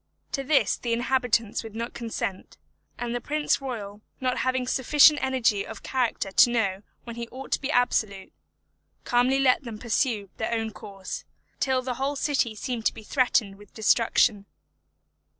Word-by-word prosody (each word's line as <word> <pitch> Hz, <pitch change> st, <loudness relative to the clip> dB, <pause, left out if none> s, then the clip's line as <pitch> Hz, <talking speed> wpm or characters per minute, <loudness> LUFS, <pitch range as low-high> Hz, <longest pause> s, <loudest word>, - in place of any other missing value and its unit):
To 275 Hz, -, -2 dB
this 280 Hz, +1 st, +2 dB
the 235 Hz, -1 st, -2 dB
inhabitants 240 Hz, -2 st, +1 dB
would 220 Hz, -1 st, -10 dB
not 230 Hz, +1 st, -4 dB
consent; 225 Hz, -5 st, -5 dB, 0.4 s
and 240 Hz, -1 st, -3 dB
the 245 Hz, -, -2 dB
prince 300 Hz, +2 st, 0 dB
royal 210 Hz, -6 st, -6 dB, 0.2 s
not 255 Hz, -1 st, -1 dB
having 255 Hz, 0 st, 0 dB
sufficient 290 Hz, +4 st, +5 dB
energy 245 Hz, -6 st, +1 dB
of -, -, -10 dB
character 245 Hz, -6 st, -1 dB
to 240 Hz, -, +6 dB
know 200 Hz, -5 st, 0 dB, 0.2 s
when 235 Hz, -1 st, -8 dB
he 235 Hz, 0 st, -4 dB
ought 260 Hz, +3 st, -10 dB
to -, -, +1 dB
be 275 Hz, -, -3 dB
absolute, 220 Hz, -7 st, 0 dB, 0.7 s
calmly 245 Hz, +2 st, +2 dB
let 265 Hz, -2 st, +3 dB
them 230 Hz, -4 st, -7 dB
pursue 220 Hz, -3 st, -1 dB
their 230 Hz, +1 st, -2 dB
own 225 Hz, -1 st, -2 dB
course, 195 Hz, -2 st, -8 dB, 0.4 s
till 260 Hz, -1 st, +1 dB
the 250 Hz, 0 st, -2 dB
whole 280 Hz, +2 st, 0 dB
city 270 Hz, -6 st, 0 dB
seemed 230 Hz, +1 st, -2 dB
to -, -, -2 dB
be 220 Hz, -, -10 dB
threatened 215 Hz, -4 st, +1 dB
with 205 Hz, 0 st, -18 dB
destruction. 220 Hz, -2 st, +2 dB
240 Hz, 165 wpm, -26 LUFS, 215-260 Hz, 0.7 s, to